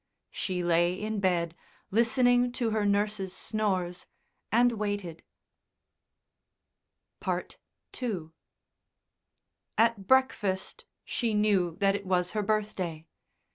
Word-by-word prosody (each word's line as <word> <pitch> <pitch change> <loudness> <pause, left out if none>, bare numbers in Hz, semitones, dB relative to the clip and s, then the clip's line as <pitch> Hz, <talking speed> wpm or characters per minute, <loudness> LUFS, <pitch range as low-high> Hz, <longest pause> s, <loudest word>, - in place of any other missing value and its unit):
She 180 -2 -2
lay 175 +1 +3
in 215 +2 -3
bed, 170 -3 +1 0.4
listening 245 +3 +3
to 235 -3 -1
her 215 -1 +1
nurse's 200 -2 0
snores, 190 -5 -1 0.4
and 240 +3 +5
waited. 205 -6 -3 2.1
II 190 -11 -5 1.5
At 225 -4 +2
breakfast 210 -8 +1 0.2
she 230 -3 -1
knew 195 -5 +2
that 195 +1 +2
it 200 -1 -4
was 180 -1 +1
her 215 - -1
birthday. 200 -6 -2
205 Hz, 95 wpm, -29 LUFS, 180-220 Hz, 2.1 s, and